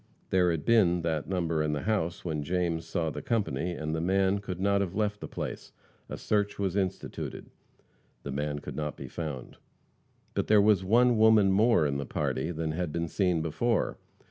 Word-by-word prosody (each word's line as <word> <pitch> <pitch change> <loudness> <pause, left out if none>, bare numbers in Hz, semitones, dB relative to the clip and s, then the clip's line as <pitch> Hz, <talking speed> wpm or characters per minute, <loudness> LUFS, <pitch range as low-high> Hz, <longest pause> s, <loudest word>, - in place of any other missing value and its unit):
There 90 -1 +4
had 80 -3 -2
been 90 -7 +4
that 80 -1 -2
number 85 -4 0
in 75 0 0
the 75 - -3
house 90 -7 -1
when 80 -3 -2
James 85 +1 -1
saw 80 -4 -1
the - - -6
company, 90 - -1
and 80 -2 -4
the 80 - -1
man 95 +2 +2
could 95 -3 -6
not 100 +1 +2
have 95 -2 -3
left 105 0 0
the - - -6
place. - - -6 0.4
A - - -5
search 105 -1 0
was 95 -2 -1
instituted. 95 -2 -4 0.7
The 70 - -5
man 75 +1 -2
could 75 - -7
not 75 -1 -3
be - - -7
found. 75 -7 -6 0.8
But - - -1
there 105 -1 +6
was 100 -2 +4
one 120 +4 +4
woman 110 -3 +6
more 105 -3 +4
in 70 -1 0
the 70 -2 -4
party 65 +5 -2
than 80 -2 -2
had 85 0 -2
been 85 +2 -2
seen 90 -2 +1
before. 105 +9 0
90 Hz, 195 wpm, -29 LUFS, 80-100 Hz, 0.8 s, there